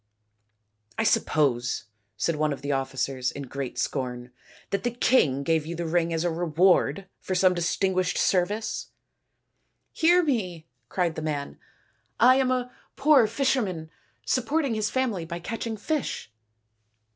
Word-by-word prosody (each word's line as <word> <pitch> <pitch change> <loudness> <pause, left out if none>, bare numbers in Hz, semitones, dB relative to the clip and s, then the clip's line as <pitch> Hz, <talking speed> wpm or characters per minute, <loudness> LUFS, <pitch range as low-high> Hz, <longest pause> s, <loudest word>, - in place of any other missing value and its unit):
" 105 -1 -38
I - - +1
suppose," 130 -6 +1 0.3
said 165 +9 0
one 155 0 +1
of 140 - -5
the 145 - -1
officers 135 -1 -1
in 140 - -7
great 135 -1 -5
scorn, 125 -2 -3 0.2
" - - -25
that 200 - 0
the 245 - +1
king 165 - +2
gave 160 0 +1
you 170 - -4
the 170 +1 -3
ring 170 0 +1
as 165 0 0
a 175 - +1
reward 175 +3 +2
for 185 - -3
some 185 0 +4
distinguished 185 +1 0
service? 200 +4 0 0.4
" - - -51
" - - -49
Hear 350 +2 +6
me," 185 - -2 0.2
cried 175 +1 0
the 160 - -5
man; 145 -2 -4 0.3
" - - -42 0.3
I 255 +2 +7
am 265 -1 +2
a 250 -1 -1 0.2
poor 275 -5 +5
fisher 260 +3 +1
man, 165 -6 -5 0.3
supporting 275 +1 0
his 215 -1 0
family 245 -9 -1
by 170 +1 -5
catching 225 +5 -4
fish." 275 - -3
175 Hz, 160 wpm, -26 LUFS, 140-225 Hz, 0.4 s, I